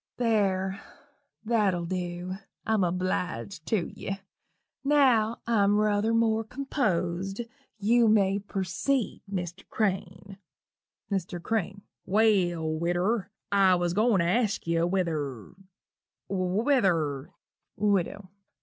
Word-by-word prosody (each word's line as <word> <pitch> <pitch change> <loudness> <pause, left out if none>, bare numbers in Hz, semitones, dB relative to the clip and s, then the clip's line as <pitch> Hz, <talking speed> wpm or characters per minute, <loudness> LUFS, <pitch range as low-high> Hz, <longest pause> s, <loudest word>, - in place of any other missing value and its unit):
There 195 -5 +1 0.6
that'll 205 -6 +1
dew 180 0 -4 0.3
I'm 220 -3 +2
obleeged 155 - -2
tew 200 -7 0
ye 195 0 -5 0.6
now 255 -6 +3
I'm 205 -3 +3
ruther 210 +1 +2
more 225 -1 +2
composed 195 - -2 0.4
you 230 +3 +4
may 200 -2 +3
perceed, 200 +6 -2
Mr. 180 -1 -4
Crane." 195 -1 -2 0.7
MR. 180 -2 -2
CRANE. 200 -2 -2 0.2
"Well, 190 -6 +2
widder, 175 +7 0 0.2
I 195 -2 +5
was 175 -1 0
a - - -4
going 215 -3 +3
to - - +1
ask 215 +3 +1
you 165 0 +1
whether 155 - -2 0.7
whether 185 - +1 0.3
" - - -60
WIDOW. 200 -1 0
195 Hz, 105 wpm, -28 LUFS, 175-220 Hz, 0.7 s, I